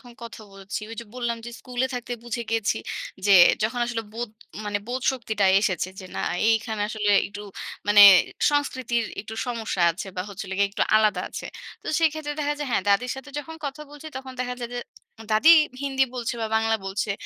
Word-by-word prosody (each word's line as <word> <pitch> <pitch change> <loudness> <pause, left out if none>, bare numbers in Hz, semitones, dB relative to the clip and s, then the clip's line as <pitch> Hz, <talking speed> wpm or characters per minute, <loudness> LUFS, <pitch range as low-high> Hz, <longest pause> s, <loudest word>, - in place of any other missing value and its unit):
যখন 245 -1 -14
কথা 230 -1 -9
বলছি, 195 +1 -6
ওই - - -6
যে - - -9
বললাম 240 -2 -2
যে - - -6
স্কুলে 250 +1 -2
থাকতে 245 0 -5
বুঝে 240 0 -3
গিয়েছি 225 -2 +1 0.5
যে 200 - +5 0.3
যখন 235 +3 -1
আসলে 235 -1 -3
বোধ 235 +1 -4 0.4
মানে 205 -1 -1
বোধশক্তিটা 245 -5 0
এসেছে 190 -3 0
যে - - -10
না - - -2 0.3
এইখানে 225 -1 0
আসলে 215 -1 0 0.2
একটু 200 +1 -9 0.5
মানে 205 0 +8 0.5
সংস্কৃতির 260 -5 0 0.2
একটু 220 +2 -8
সমস্যা 225 -6 -2
আছে। 170 +5 -6
বা 180 - -1
হচ্ছিল 195 -1 -7
গে - - +4
একটু 200 - -1
আলাদা 215 -4 +3
আছে। - - -6 0.4
তো - - -13
সেক্ষেত্রে 310 -2 0
দেখা 295 0 0
যায় 295 - -3
হ্যাঁ 215 - +1
দাদীর 225 +5 +3
সাথে 265 +2 -9
যখন 320 +2 -7
কথা 285 +2 -5
বলছি 295 +1 -11
তখন 265 0 -7
দেখা 250 0 -2
যায় 240 - -5
যে 245 - -2 0.5
দাদী 220 +10 +6 0.3
হিন্দি 270 -1 +2
বলছে 245 -1 -2
বা 225 - 0
বাংলা 225 0 +2
বলছে 200 +2 -2
235 Hz, 190 wpm, -25 LUFS, 210-255 Hz, 0.5 s, মানে